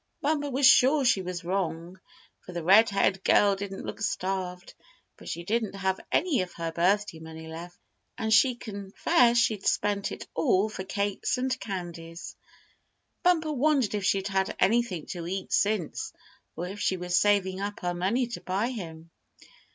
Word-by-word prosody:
Bumper 290 Hz, -1 st, 0 dB
was 270 Hz, +1 st, +1 dB
sure 275 Hz, +2 st, +6 dB
she 240 Hz, -6 st, +3 dB
was 180 Hz, -1 st, -5 dB
wrong, 175 Hz, -1 st, -3 dB, 0.4 s
for 180 Hz, -, -12 dB
the 170 Hz, -1 st, -4 dB
red 200 Hz, +6 st, +6 dB
haired 195 Hz, -1 st, +1 dB
girl 200 Hz, -1 st, +4 dB
didn't 195 Hz, 0 st, -6 dB
look -, -, -7 dB
starved; 185 Hz, -3 st, -3 dB, 0.4 s
but -, -, -11 dB
she 170 Hz, -, -4 dB
didn't 215 Hz, +1 st, -1 dB
have 190 Hz, -1 st, -1 dB
any 315 Hz, -, +2 dB
of 180 Hz, -1 st, -5 dB
her 165 Hz, -1 st, -4 dB
birthday 180 Hz, +1 st, +1 dB
money 160 Hz, 0 st, -10 dB
left, 170 Hz, +2 st, -9 dB, 0.4 s
and 220 Hz, -1 st, 0 dB
she 250 Hz, +3 st, +5 dB
confessed 235 Hz, -, +1 dB
she'd 215 Hz, -4 st, +1 dB
spent 205 Hz, -1 st, 0 dB
it -, -, -7 dB
all 185 Hz, +6 st, +2 dB
for 190 Hz, -, -6 dB
cakes 200 Hz, +4 st, -1 dB
and 255 Hz, 0 st, -1 dB
candies. 170 Hz, -4 st, -7 dB, 0.9 s
Bumper 325 Hz, -4 st, +2 dB
wondered 275 Hz, -5 st, +2 dB
if 205 Hz, -2 st, -2 dB
she'd 195 Hz, +1 st, +1 dB
had 190 Hz, -1 st, 0 dB
anything 195 Hz, -5 st, +1 dB
to 170 Hz, -2 st, -6 dB
eat 190 Hz, +1 st, -4 dB
since, 205 Hz, -5 st, 0 dB, 0.4 s
or 175 Hz, -, -4 dB
if 200 Hz, +3 st, -7 dB
she 190 Hz, -, 0 dB
was 180 Hz, 0 st, -2 dB
saving 190 Hz, -1 st, +2 dB
up 205 Hz, +1 st, -4 dB
her 175 Hz, 0 st, -1 dB
money 195 Hz, +9 st, 0 dB
to 235 Hz, -, -7 dB
buy 195 Hz, +6 st, -1 dB
him. 165 Hz, -7 st, -8 dB
195 Hz, 165 wpm, -27 LUFS, 180-225 Hz, 0.9 s, sure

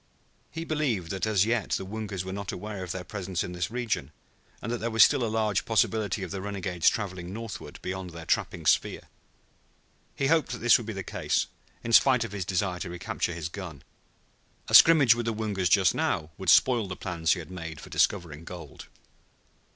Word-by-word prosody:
He 165 Hz, 0 st, -6 dB
believed 130 Hz, -, -1 dB
that 95 Hz, +2 st, -2 dB
as 105 Hz, -2 st, +3 dB
yet 115 Hz, -1 st, 0 dB
the 95 Hz, -, -1 dB
Woongas 100 Hz, -2 st, -5 dB
were 95 Hz, -, -5 dB
not 100 Hz, -1 st, -4 dB
aware 105 Hz, 0 st, -6 dB
of 90 Hz, -, -5 dB
their 90 Hz, 0 st, -4 dB
presence 95 Hz, -1 st, -4 dB
in 90 Hz, -, -6 dB
this 90 Hz, -1 st, -3 dB
region, 115 Hz, -, -2 dB, 0.5 s
and 115 Hz, -, -5 dB
that 120 Hz, -, -2 dB
there 115 Hz, -, -2 dB
was 110 Hz, -1 st, +6 dB
still 140 Hz, -4 st, +3 dB
a -, -, +1 dB
large 110 Hz, -2 st, 0 dB
possibility 110 Hz, -3 st, 0 dB
of 90 Hz, -, -6 dB
the 95 Hz, -, -4 dB
renegades 95 Hz, -4 st, +1 dB
traveling 95 Hz, -4 st, -5 dB
northward 115 Hz, 0 st, -7 dB
beyond 95 Hz, 0 st, -4 dB
their 85 Hz, -1 st, -9 dB
trapping -, -, -1 dB
sphere. -, -, +1 dB, 1.1 s
He 135 Hz, -, -1 dB
hoped 155 Hz, -3 st, +2 dB
that -, -, -4 dB
this 120 Hz, 0 st, +5 dB
would 115 Hz, -, -8 dB
be 110 Hz, -, -4 dB
the 95 Hz, -1 st, -5 dB
case, -, -, -1 dB, 0.4 s
in 115 Hz, -, -3 dB
spite 125 Hz, -1 st, +6 dB
of 115 Hz, -, -6 dB
his 100 Hz, -3 st, -4 dB
desire 90 Hz, -1 st, -1 dB
to 90 Hz, -, -5 dB
recapture 85 Hz, 0 st, -3 dB
his 85 Hz, -2 st, -4 dB
gun. 85 Hz, -5 st, -8 dB, 0.9 s
A -, -, -5 dB
scrimmage 145 Hz, -8 st, +8 dB
with 120 Hz, 0 st, -4 dB
the 115 Hz, -, 0 dB
Woongas 100 Hz, -5 st, -1 dB
just 95 Hz, -1 st, +4 dB
now 75 Hz, 0 st, -1 dB
would 95 Hz, -2 st, -3 dB
spoil 120 Hz, +3 st, +5 dB
the 90 Hz, -, -5 dB
plans 85 Hz, -3 st, 0 dB
he 90 Hz, -, -4 dB
had 85 Hz, +1 st, -9 dB
made 80 Hz, -4 st, -7 dB
for -, -, -12 dB
discovering 85 Hz, -5 st, 0 dB
gold. 85 Hz, -4 st, -10 dB
95 Hz, 205 wpm, -27 LUFS, 90-115 Hz, 1.1 s, scrimmage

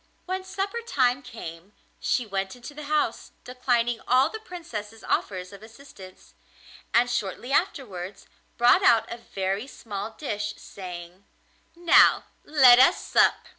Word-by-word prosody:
When 375 Hz, +1 st, -3 dB
supper 395 Hz, +5 st, -4 dB
time 260 Hz, -, +1 dB
came 180 Hz, -6 st, -10 dB, 0.3 s
she 245 Hz, -, 0 dB
went 195 Hz, -1 st, -3 dB
into 250 Hz, +4 st, -10 dB
the 300 Hz, 0 st, -9 dB
house, 305 Hz, +1 st, -1 dB
declining 245 Hz, -2 st, 0 dB
all 260 Hz, +4 st, +4 dB
the 440 Hz, -, -6 dB
Princess's 235 Hz, -, -8 dB
offers 185 Hz, -1 st, -2 dB
of 200 Hz, -, -12 dB
assistance, 220 Hz, -5 st, -14 dB, 0.6 s
and 240 Hz, +1 st, +4 dB
shortly 240 Hz, +1 st, -3 dB
afterwards 200 Hz, -, -2 dB, 0.3 s
brought 240 Hz, +1 st, +5 dB
out 230 Hz, -1 st, +4 dB
a -, -, -7 dB
very 195 Hz, +1 st, -3 dB
small 210 Hz, -4 st, -7 dB
dish, 205 Hz, -7 st, -4 dB
saying: 180 Hz, 0 st, -10 dB, 0.5 s
'Now 345 Hz, 0 st, +5 dB, 0.2 s
let 260 Hz, -5 st, +7 dB
us 270 Hz, +8 st, +5 dB
sup. -, -, +3 dB
235 Hz, 130 wpm, -25 LUFS, 200-280 Hz, 0.6 s, let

